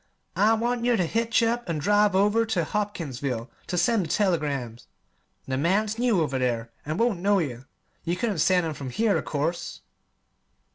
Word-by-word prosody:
I 210 +5 +4
want 235 +1 -1
yer 240 -1 +3
ter 180 - +1
hitch 230 +5 +1
up 235 -2 -1
an' 165 - -1
drive 205 +4 +3
over 210 +4 +3
ter 220 -7 0
Hopkinsville 145 - -3 0.2
ter 180 - -2
send 200 +4 +2
the - - -8
telegrams. 145 - -1 0.6
The 130 0 -1
man's 205 +7 +1
new 235 -7 +2
over 135 -4 -1
there, 120 -2 -1 0.2
an' 155 +2 -2
won't 230 -6 +1
know 200 +2 +3
yer. 130 -7 -3 0.4
You 170 +1 -1
couldn't 200 -2 -2
send 180 +1 +3
'em 160 - -2
from 140 -3 -6
here, 215 - +1
of - - -7
course." 160 +4 -3
180 Hz, 180 wpm, -26 LUFS, 145-215 Hz, 0.6 s, I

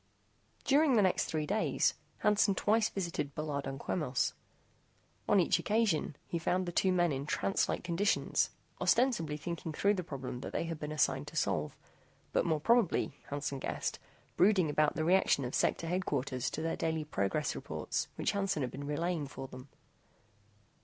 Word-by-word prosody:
During 285 -1 +4
the 210 - +5
next 185 - +2
three 155 -1 -2
days, 210 +6 +1 0.3
Hansen 205 -1 +3
twice 215 +2 +2
visited 170 -7 -3
Bullard 150 -2 -3
and 135 0 -5
Quemos. 145 -5 -1 1.0
On 205 - +5
each 175 - +3
occasion, 205 -9 +1
he 170 - -3
found 180 +2 0
the 175 - -3
two 185 +2 +2
men 175 -2 +3
in 140 +1 -3
trance 195 - +1
like - - -2
conditions, 180 +4 +1 0.3
ostensibly 235 - +2
thinking 165 +1 -5
through 200 +6 +2
the 185 -3 -2
problem 135 -6 -6
that - - -7
they - - 0
had 165 -2 -4
been 150 0 -4
assigned 145 -2 +1
to 150 - -9
solve, 85 - -1 0.6
but - - +2
more 160 -2 +2
probably, 230 +3 +2 0.2
Hansen 145 -1 -3
guessed, - - -3 0.4
brooding 185 -5 +4
about 150 0 +2
the 155 - -1
reaction 175 -6 +3
of 125 - -5
Sector - - +1
Headquarters 145 -8 -1
to 155 - -4
their 165 - 0
daily 160 -1 -1
progress 100 -9 -1
reports - - -3
which - - 0
Hansen 195 -7 0
had 125 - -3
been 140 +1 -6
relaying 160 0 -1
for 135 -1 -7
them. 130 +1 -11
160 Hz, 170 wpm, -32 LUFS, 145-190 Hz, 1.0 s, the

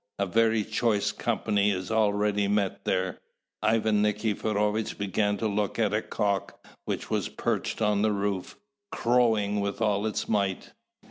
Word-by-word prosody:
a 100 - +1
very 110 +2 +2
choice 110 -1 +1
company 105 -2 0
is 95 0 -2
already 105 -2 +2
met 100 -1 -1
there." 95 0 -1 0.4
Ivan 110 -1 +2
Nikiforovitch 105 0 0
began 105 +1 0
to 110 - -1
look 105 -1 -1
at 105 -3 +1
a 105 - +1
cock, 100 -3 -2 0.2
which - - -4
was - - 0
perched - - -2
on 105 -1 +2
the 110 0 +3
roof, 100 -2 -2 0.3
crowing 110 -4 +2
with 100 0 -2
all 105 -1 +1
its 110 - -3
might. 100 -3 -1
105 Hz, 145 wpm, -27 LUFS, 100-110 Hz, 0.4 s, the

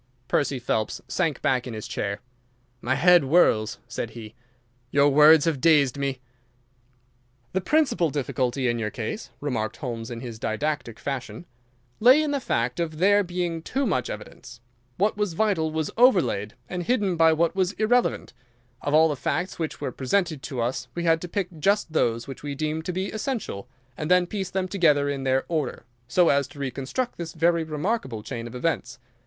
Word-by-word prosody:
Percy 140 -2 +1
Phelps 110 -3 -2
sank 165 -5 -1
back 130 -1 +1
in 120 - -6
his 110 - -6
chair. 100 0 -3 0.6
"My 130 +2 0
head 175 +4 +6
whirls," 130 -7 +3
said 115 -1 -4
he. 110 -1 -10 0.6
"Your 140 +2 +4
words 150 +2 +7
have 155 -6 0
dazed 150 -6 +4
me." 140 -2 -2 1.3
"The 190 - 0
principal 240 - +2
difficulty 130 -2 -1
in 120 -1 0
your 105 -2 -1
case," 120 - -5
remarked 115 -7 -2
Holmes, 120 -4 -5
in 120 -1 -6
his 120 -3 -7
didactic 120 0 -2
fashion, 135 +8 -5 0.5
"lay 255 +6 +7
in 300 - -1
the 285 - 0
fact 125 - -1
of 160 -2 -2
there 205 +4 +4
being 175 -2 -3
too 270 +11 -1
much 130 - 0
evidence. 110 +3 -9 0.4
What 205 +3 +1
was 210 -4 -1
vital 175 -4 +1
was 155 -1 -2
overlaid 180 - +3
and 180 0 -4
hidden 200 -1 +1
by 165 -1 +5
what 165 +3 +1
was 190 0 +1
irrelevant. 240 +4 +1 0.5
Of 145 +1 0
all 160 +1 +6
the 150 - -1
facts 175 +8 -2
which 160 -2 -3
were 140 -3 -3
presented 155 +3 -1
to 130 -3 -4
us 120 +1 -2
we 170 - -2
had 165 -1 +3
to 180 - -5
pick 180 -2 -4
just 200 0 +1
those 115 -5 +1
which 135 - -8
we 145 -1 -5
deemed 155 +2 -2
to - - -2
be 185 +2 -3
essential, 220 - -4 0.3
and 150 +4 -4
then 180 0 +5
piece 190 0 -4
them 185 0 -2
together 155 -7 +3
in 135 -1 -3
their 130 0 +1
order, 155 -9 -2 0.2
so 170 +7 +4
as 140 -1 +2
to 155 -3 -14
reconstruct 140 - -3
this 165 -1 -5
very 170 0 +2
remarkable 155 - -3
chain 115 +1 -5
of 120 - -10
events. 125 -4 -2
155 Hz, 180 wpm, -25 LUFS, 125-180 Hz, 1.3 s, words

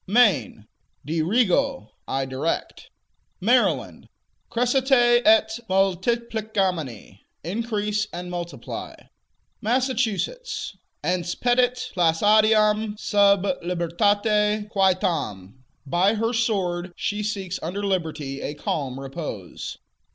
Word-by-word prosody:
Maine 205 - +3 0.4
Dirigo: 210 - +1 0.2
I 135 0 -1
direct. 135 +5 -3 0.5
Maryland - - +1 0.4
Crescite 245 0 +3
et 220 +1 +4
multiplicamini: 195 - -1 0.2
Increase 210 +2 -1
and 180 +1 -6
multiply. 175 -1 -6 0.7
Massachusetts 255 - -1 0.3
Ense 175 -1 -1
petit 250 0 +1
placidam 210 +4 +3
sub 200 -2 +3 0.2
libertate 205 +5 +1
quietam: 150 - 0 0.2
By 180 +9 +2
her 225 +2 0
sword 190 -6 -1
she 205 +1 -2
seeks 195 -3 -3
under 195 +5 -3
liberty 155 -7 -2
a 145 - -4
calm 135 -3 -3
repose. 135 - -6
200 Hz, 85 wpm, -24 LUFS, 170-220 Hz, 0.7 s, et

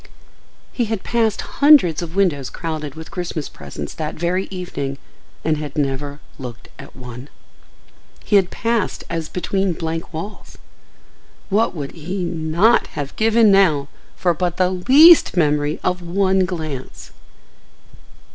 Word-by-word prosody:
He 240 - 0
had 220 -3 -3
passed 225 -3 0
hundreds 280 - +4
of 170 0 -7
windows 150 -10 +1
crowded 155 -4 -5
with 160 0 -10
Christmas 175 -5 -4
presents 70 0 -8
that 155 -1 -4
very 180 +3 -1
evening 175 -7 -5 0.5
and 155 -1 +2
had 150 -2 -6
never 145 0 -2 0.2
looked 125 -2 -9
at - - -12
one. 125 +1 -10 0.9
He 210 - +1
had 190 -3 +4
passed 230 -3 -1
as 165 -2 -3
between 190 0 -1
blank 165 +1 -4
walls. 175 +6 -8 0.9
What 210 +1 +1
would 140 -3 -5
he 180 +4 -5
not 170 +5 +2
have 145 -1 -4
given 220 -1 +4
now 160 -8 +3 0.3
for 175 -2 +1
but 175 +1 -2
the 185 0 +2
least 270 - +6
memory 150 -2 +1
of 180 0 0
one 190 +2 +1
glance! 155 -7 -6
170 Hz, 135 wpm, -20 LUFS, 150-195 Hz, 0.9 s, least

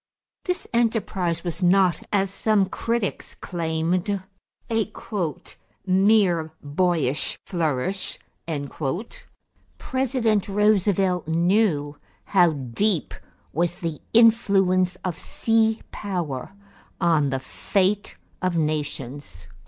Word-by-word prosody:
This 360 -1 -2
enterprise 205 -7 0
was 175 0 -4
not, 185 0 +4
as 195 -2 +1
some 205 0 +2
critics 230 0 -2
claimed, 170 +3 -1 0.5
a 220 -1 0 0.9
"mere 190 -4 +3
boyish 150 -2 0
flourish." 170 +1 -1 1.6
President 250 -6 0
Roosevelt 195 -3 +2
knew 165 -3 +2 0.3
how 175 -4 +4
deep 150 - 0 0.4
was 170 +1 0
the 165 -3 -5
influence 195 -6 +4
of 175 -2 -2
sea 225 -1 +1
power 175 -7 -4 0.5
on 160 -5 +3
the 135 0 -1
fate 195 +8 -1 0.2
of 185 -2 0
nations. 145 - -3
185 Hz, 85 wpm, -24 LUFS, 160-205 Hz, 1.6 s, not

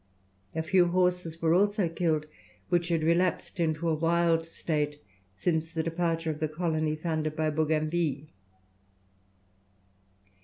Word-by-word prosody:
A 160 - -1
few 175 +2 +4
horses 180 -2 0
were 160 0 +4
also 205 +1 +3
killed 165 -2 0 0.4
which 175 -1 +2
had 165 -2 0
relapsed 175 +3 +1
into 160 0 0
a 165 - +2
wild 165 +1 +2
state 150 -3 -2 0.4
since 160 - -1
the 160 -1 -1
departure 165 -1 -1
of 150 - -7
the 155 - 0
colony 155 -1 -1
founded 155 -1 -2
by 155 0 0
Bougainville. 155 -1 0
165 Hz, 125 wpm, -29 LUFS, 155-170 Hz, 0.4 s, few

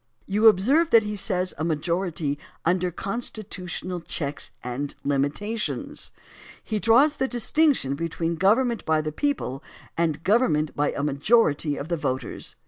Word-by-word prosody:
You 210 +3 +3
observe 260 - +4
that 230 -1 +6
he 210 0 -4
says 185 -2 +1
a - - -1
majority 160 -2 -1 0.3
under 180 +1 +2
"con 195 +6 -4
stitiitional 185 -5 -5
checks 145 -2 -3
and 130 +3 -4
limitations." 145 +11 -2 0.5
He 215 -1 -2
draws 255 +8 +4
the 265 - 0
distinction 255 - +2
between 165 +2 -2
government 225 +7 +2
by 160 -1 +1
the 155 0 -4
people 155 - -2 0.3
and 160 -2 -1
government 195 - +2
by 145 0 +1
a 140 - -3
majority 150 0 +2
of 145 - -5
the 170 0 -1
voters. 130 -4 -4
175 Hz, 140 wpm, -25 LUFS, 150-220 Hz, 0.5 s, that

